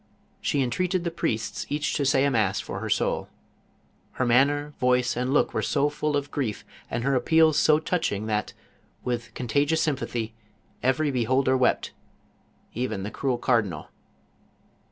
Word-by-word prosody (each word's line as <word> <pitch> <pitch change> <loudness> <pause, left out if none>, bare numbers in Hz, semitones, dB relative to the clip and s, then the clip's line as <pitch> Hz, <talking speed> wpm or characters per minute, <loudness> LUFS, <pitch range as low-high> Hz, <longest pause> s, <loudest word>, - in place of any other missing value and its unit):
She 140 - +1
entreated 180 +8 0
the 170 - -2
priests 110 -9 -2
each 145 +1 -1
to 145 - 0
say 135 0 +3
a 140 - +2
mass 105 -5 +1
for - - -5
her - - -4
soul. - - 0 0.8
Her 130 - -1
manner, 145 +4 +2
voice, 125 -1 +2
and 125 +2 -1
look 145 - +2
were 110 - 0
so 145 +6 +1
full 150 0 -1
of 145 0 -4
grief, 120 -8 -3 0.2
and 115 - -2
her 135 +1 +1
appeals 155 +3 +4
so 155 - +5
touching 155 - -1
that, 105 -1 -2 0.5
with 120 -1 -3
contagious 145 +6 +1
sympathy, 120 -6 -2 0.5
every 130 +4 +1
beholder 130 +1 +2
wept 130 - +1 0.4
— - - -37
even 110 -6 -3
the 105 - -4
cruel 130 -3 -1
cardinal. 105 - 0
130 Hz, 155 wpm, -26 LUFS, 120-145 Hz, 0.8 s, so